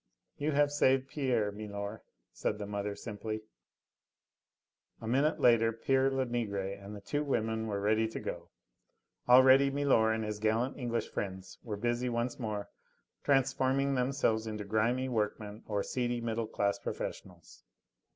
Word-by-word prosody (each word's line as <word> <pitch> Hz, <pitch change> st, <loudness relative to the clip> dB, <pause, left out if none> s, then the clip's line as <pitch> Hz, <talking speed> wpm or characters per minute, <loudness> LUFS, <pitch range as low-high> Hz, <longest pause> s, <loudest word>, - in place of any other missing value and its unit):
"You 150 Hz, +1 st, 0 dB
have 145 Hz, 0 st, +3 dB
saved 135 Hz, -2 st, +2 dB
Pierre, 125 Hz, -8 st, 0 dB
milor," 100 Hz, 0 st, -6 dB, 0.3 s
said 105 Hz, -, -2 dB
the 105 Hz, -, -5 dB
mother 100 Hz, 0 st, -3 dB
simply. 110 Hz, 0 st, -5 dB, 1.6 s
A 110 Hz, -, -7 dB
minute 140 Hz, +6 st, +2 dB
later 115 Hz, -2 st, +5 dB
pere 135 Hz, +4 st, +2 dB
Lenegre 120 Hz, -7 st, -1 dB
and 100 Hz, +2 st, -8 dB
the 100 Hz, -, -9 dB
two 145 Hz, +8 st, -1 dB
women 110 Hz, -5 st, -1 dB
were 100 Hz, -2 st, -2 dB
ready 110 Hz, +2 st, +2 dB
to 110 Hz, -, -6 dB
go. -, -, -6 dB, 0.8 s
Already 130 Hz, +2 st, +7 dB
milor 135 Hz, -6 st, +3 dB
and 110 Hz, 0 st, -1 dB
his 105 Hz, -1 st, -4 dB
gallant 110 Hz, +5 st, +1 dB
English 120 Hz, -3 st, -2 dB
friends 95 Hz, -1 st, -5 dB
were 105 Hz, -4 st, -5 dB
busy 120 Hz, +3 st, 0 dB
once 120 Hz, +1 st, -2 dB
more 105 Hz, -4 st, -3 dB, 0.6 s
transforming 135 Hz, 0 st, +2 dB
themselves 125 Hz, -4 st, +1 dB
into 105 Hz, -1 st, -4 dB
grimy 115 Hz, +5 st, +1 dB
workmen 105 Hz, -2 st, -2 dB
or 105 Hz, -2 st, -1 dB
seedy 120 Hz, -1 st, -1 dB
middle 115 Hz, -1 st, -2 dB
class 100 Hz, -1 st, 0 dB
professionals. 90 Hz, -4 st, -7 dB
115 Hz, 140 wpm, -32 LUFS, 105-130 Hz, 1.6 s, Already